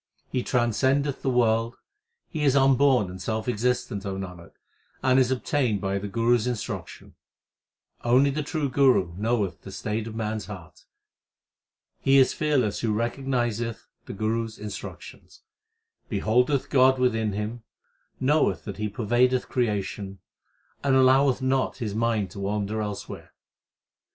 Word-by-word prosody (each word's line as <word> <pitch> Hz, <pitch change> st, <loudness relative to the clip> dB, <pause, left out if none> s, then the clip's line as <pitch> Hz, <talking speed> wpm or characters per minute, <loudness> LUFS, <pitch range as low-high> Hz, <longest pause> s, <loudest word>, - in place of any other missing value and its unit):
He 125 Hz, -, 0 dB
transcendeth 130 Hz, +4 st, +1 dB
the 135 Hz, -, 0 dB
world, 115 Hz, -1 st, +2 dB, 0.5 s
He 155 Hz, -2 st, -4 dB
is 140 Hz, -2 st, +3 dB
unborn 135 Hz, -4 st, +4 dB
and 95 Hz, 0 st, -9 dB
self 110 Hz, +2 st, -3 dB
existent, 120 Hz, -3 st, -1 dB
O 100 Hz, -2 st, -4 dB
Nanak, 90 Hz, -3 st, -8 dB, 0.5 s
and 130 Hz, 0 st, +4 dB
is 130 Hz, -1 st, +3 dB
obtained 125 Hz, -4 st, 0 dB
by 95 Hz, 0 st, -1 dB
the 105 Hz, -, -5 dB
Guru 115 Hz, +4 st, +2 dB
s 115 Hz, +1 st, -3 dB
in 125 Hz, -, 0 dB
struction. 105 Hz, -, -7 dB, 0.9 s
Only 130 Hz, +4 st, +4 dB
the 150 Hz, +3 st, -2 dB
True 150 Hz, 0 st, -2 dB
Guru 125 Hz, -10 st, +3 dB
knoweth 105 Hz, -5 st, -1 dB
the 95 Hz, -, -10 dB
state 105 Hz, +3 st, -3 dB
of 110 Hz, -, -7 dB
man 110 Hz, -1 st, -2 dB
s 105 Hz, -, -6 dB
heart. 90 Hz, -6 st, -11 dB, 1.1 s
He 135 Hz, 0 st, +4 dB
is 130 Hz, -1 st, +5 dB
fearless 135 Hz, -9 st, 0 dB
who 115 Hz, -, 0 dB
recognizeth 120 Hz, -1 st, -2 dB, 0.2 s
the -, -, -6 dB
Guru 110 Hz, +3 st, -1 dB
s 110 Hz, -1 st, -10 dB
instructions, 105 Hz, -2 st, -9 dB, 0.7 s
Beholdeth 125 Hz, +5 st, +1 dB
God 130 Hz, 0 st, +5 dB
within 115 Hz, -4 st, +1 dB
him, 105 Hz, +4 st, -4 dB, 0.6 s
knoweth 145 Hz, +4 st, +2 dB
that 100 Hz, -3 st, -6 dB
He 105 Hz, 0 st, -2 dB
pervadeth 120 Hz, +4 st, +1 dB
creation, 100 Hz, -4 st, -2 dB, 0.7 s
and 135 Hz, -1 st, +3 dB
alloweth 130 Hz, 0 st, +4 dB
not 130 Hz, 0 st, 0 dB
his 110 Hz, -6 st, -3 dB
mind 110 Hz, -4 st, 0 dB
to -, -, -9 dB
wander 105 Hz, +2 st, -2 dB
elsewhere. 105 Hz, -1 st, -6 dB
115 Hz, 145 wpm, -26 LUFS, 105-130 Hz, 1.1 s, is